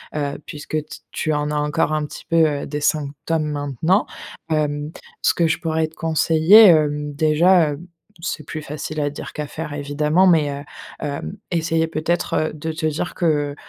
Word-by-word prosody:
heu, 145 -1 -2
puisque 150 -1 -9
t - - -10
tu 155 - -1
en 150 0 -1
as 150 - -2
encore 150 +2 0
un 155 -1 0
petit - - -10
peu, 165 - 0 0.3
heu, - - -4
des 150 0 -4
symptômes 150 +2 -1
maintenant. 145 - 0 0.5
Hem, 150 -1 -1 0.3
ce - - +4
que 170 - +2
je 155 - +1
pourrais 160 -1 0
te 160 - -19
conseiller, 165 +6 +5
hem, 150 -3 +3
déjà, 155 +2 +4
heu, 145 - -6 0.4
c'est 165 -2 -4
plus 155 -1 -6
facile 150 +1 -5
à 145 -1 0
dire - - -8
qu'à 150 - -4
faire 150 0 -6
évidemment, 150 +5 +1
mais, 155 -5 +4
heu, 140 0 -6 0.4
hem, 140 - -5
essayer 165 -1 +1
peut-être, 165 +2 -1 0.2
heu, - - -12
de 155 +1 -4
te 160 0 -4
dire 155 +3 -2
que, 150 -4 0
155 Hz, 185 wpm, -21 LUFS, 145-160 Hz, 0.5 s, conseiller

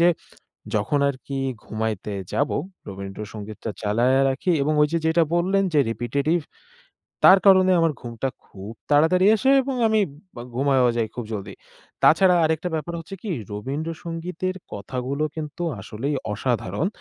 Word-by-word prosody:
যে 170 - +6 0.7
যখন 110 +8 +1
আর 140 - -1
কি 135 -1 -4 0.3
ঘুমাইতে 110 -2 -3 0.2
যাব 145 - +1 0.4
রবীন্দ্র 95 +1 -7
সঙ্গীতটা 105 +1 -6
চালাইয়া 120 +6 +2
রাখি 135 +7 0
এবং 155 +2 +1
ওই 150 - +5
যে - - +3
যেটা 165 +1 +4
বললেন 190 +3 +2
যে 150 - +4
রিপিটেটিভ 140 +8 0 0.8
তার 190 - +9
কারণে 185 -1 +6
আমার 165 -1 +3
ঘুমটা 120 +2 -4 0.2
খুব 100 +2 -10 0.2
তাড়াতাড়ি 160 +6 +4
আসে 265 +5 +1
এবং 265 0 -3
আমি 220 0 +3 0.4
বা 120 - -7
ঘুমায়ও 135 -2 +3
যাই 115 -1 +1
খুব 120 - -4
জলদি। 100 -3 -5 0.5
তাছাড়া 180 +2 +6
আরেকটা 160 +3 0
ব্যাপার 165 +2 -4
হচ্ছে 170 +4 -8
কী 220 - -6 0.2
রবীন্দ্র 135 +10 -4
সঙ্গীতের 175 +2 -4 0.2
কথাগুলো 130 +8 -3
কিন্তু 155 +2 -6 0.2
আসলেই 120 +9 -3 0.2
অসাধারণ 115 - -1
140 Hz, 150 wpm, -23 LUFS, 115-170 Hz, 0.8 s, তার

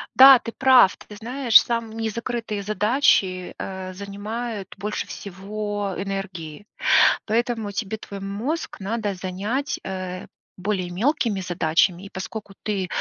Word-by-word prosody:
Да, 265 -1 +10
ты 230 - -6
прав! 255 -6 +5
Ты 210 - -12
знаешь 235 0 +5
сам: 230 -2 -2
не 225 -1 -1
закрытые 230 -2 -4
задачи, 210 -3 +2
э, 190 -1 -6
занимают 205 +2 -5
больше 210 +2 -3
всего 205 +1 -4
энергии. 195 -4 -5 0.6
Поэтому 225 -1 -1
тебе 210 +1 -3
твой 200 -1 -8
мозг 220 +12 -3
надо 205 +1 -2
занять, 195 +10 -3
э, 185 -1 -5 0.3
более 185 -1 -2
мелкими 215 - 0
задачами, 175 +1 +1
и, 200 - -9
поскольку 195 +2 -7
ты 200 -3 -1
205 Hz, 125 wpm, -23 LUFS, 190-230 Hz, 0.6 s, Да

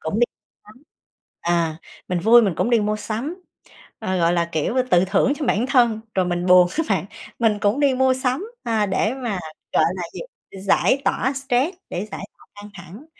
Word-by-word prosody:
cũng 160 +7 -3
đi 240 - +5 0.4
sắm, 220 +6 -18 0.6
à, 170 -2 0 0.3
mình 180 - 0
vui 230 +5 +6
mình 195 -6 0
cũng 235 - 0
đi 235 -2 +4
mua 210 +1 0
sắm, 255 - -5 0.6
ờ, 185 0 -2
gọi 170 0 +2
là, 170 -1 +1
kiểu, 160 +8 -1 0.2
tự 180 +1 +5
thưởng 260 +8 +2
cho 290 - -4
bản 230 0 +1
thân, 235 -5 +3 0.2
rồi 185 -1 +2
mình 175 0 -2
buồn 180 -1 +6
á 325 - +2
bạn, 195 -2 +1 0.3
mình 220 -3 +2
cũng 205 +6 +1
đi 280 -2 +3
mua 260 0 +3
sắm, 260 +6 -2 0.2
à, 220 -3 +1
để 205 +4 0
mà, 240 -8 -3 0.3
gọi - - +4
là 180 - -4
gì, - - -7 0.4
giải 260 +7 +2
tỏa 265 +3 +1
stress, 270 +5 -1
để 190 +4 -4
giải 195 - -7
tỏa - - -21
căng 205 0 -11
thẳng. 205 - -12
215 Hz, 200 wpm, -22 LUFS, 185-255 Hz, 0.6 s, vui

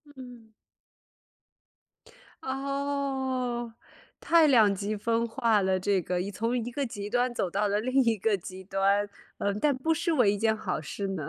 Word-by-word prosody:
嗯。 245 -4 -12 1.9
哦， 265 -3 -2 0.5
太 335 -2 +4
两 225 -7 +5
极 205 +2 -3
分 230 +2 0
化 230 -3 +2
了 190 -1 +1
这 195 0 +1
个， 180 +1 -2
一 195 - -4
从 230 +5 -1
一 240 0 -3
个 280 +3 -2
极 205 -4 -6
端 245 +2 +1
走 195 -6 -1
到 205 +3 0
了 205 +1 +1
另 255 +4 +2
一 230 -2 +2
个 210 +2 +1
极 185 +1 -9
端， 195 +1 +1 0.3
嗯， 200 0 -1
但 295 -1 +3
不 320 +5 +1
失 335 +1 -1
为 245 -10 +4
一 - - -2
件 220 +1 +2
好 215 -7 -3
事 195 +6 -5
呢。 180 -7 -4
225 Hz, 180 characters per minute, -28 LUFS, 200-260 Hz, 1.9 s, 两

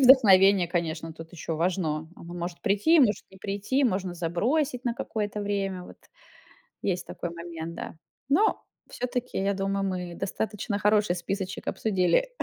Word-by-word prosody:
вдохновение, 200 -8 +7
конечно, 165 -2 -2
тут 165 +2 -11
ещё 165 -1 -4
важно, 160 -3 0
оно 170 -1 -10
может 175 0 -5
прийти, 225 +11 +4
может 210 -7 +3
не 190 - -15
прийти, 205 +8 -1
можно 185 -6 0
забросить 240 - 0
на 235 -1 0
какое-то 210 -3 -3
время, 195 -2 -2
вот. - - -12 0.9
Есть 180 -2 -1
такой 175 - -5
момент, 170 -1 -6
да. - - -6 0.3
Но 400 +10 +3 0.3
всё-таки, 250 0 -3
я 200 +1 +1
думаю, 195 0 -1
мы 180 -2 -4
достаточно 205 +1 -2
хороший 210 -3 +3
списочек 190 +2 -4
обсудили, 190 - +2
195 Hz, 145 wpm, -27 LUFS, 175-210 Hz, 0.9 s, вдохновение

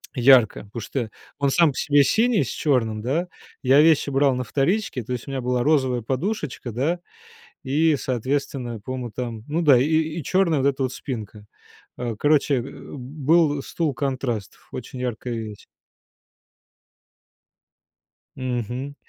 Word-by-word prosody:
ярко. 125 -3 +5
Потому 115 - -4
что 115 -1 -4 0.3
он 140 - +2
сам 170 -2 +4
по - - -10
себе 145 -2 +4
синий 225 - +3
с - - -7
черным, 115 -7 0
да. 155 +10 -1 0.4
Я 135 +3 +6
вещи 155 -3 +4
брал 135 -1 +3
на 125 - -2
вторичке. 140 - 0
То 125 - -8
есть 120 - -5
у 140 - -5
меня 135 - -2
была 125 0 0
розовая 130 -5 +2
подушечка, 135 - -3
да, 150 +10 0 0.7
и, 150 +3 +3
соответственно, 130 -2 -2
по-моему, 125 0 -5
там. 115 -2 -5
Ну 165 +3 0
да, 140 -6 +6
и 130 - +3
и 160 +1 0
черная 185 -3 +2
вот 140 - +3
эта 135 0 -1
вот 130 - -2
спинка. 105 -5 -7 0.5
А 120 -3 -3
короче, 145 +2 +3
э, - - +1
был 145 +3 0
стул-контраст. 135 - -2 0.2
Очень 125 +1 -7
яркая 125 -1 -3
вещь. 110 -2 -7 2.7
Мгм. 125 +2 -3
135 Hz, 145 wpm, -23 LUFS, 120-150 Hz, 2.7 s, Я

